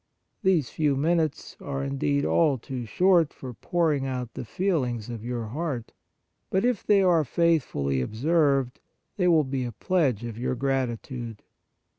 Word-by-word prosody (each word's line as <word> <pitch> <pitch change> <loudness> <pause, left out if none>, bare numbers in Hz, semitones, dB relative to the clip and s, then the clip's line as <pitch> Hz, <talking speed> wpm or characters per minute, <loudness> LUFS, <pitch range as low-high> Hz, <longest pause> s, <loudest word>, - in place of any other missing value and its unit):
These 185 - +2
few 150 -3 +1
minutes 155 +1 0
are, 135 -1 -3
indeed, 140 +1 0
all 150 -5 +3
too 125 0 -6
short 175 - +3
for 130 -2 -9
pouring 150 - 0
out 125 -2 -4
the - - -5
feelings 125 - -1
of 115 -2 -6
your 120 -1 -3
heart; 140 -3 -4 0.6
but 190 +4 +1
if 245 -5 +1
they 200 -2 +4
are 170 -4 +4
faithfully 130 - +1
observed, 135 - +1 0.4
they 180 -3 +2
will 165 -3 +5
be 130 -1 -2
a 120 - -4
pledge 130 - 0
of 115 -1 -6
your 125 +1 -1
gratitude. 125 -3 -3
135 Hz, 150 wpm, -26 LUFS, 120-165 Hz, 0.6 s, will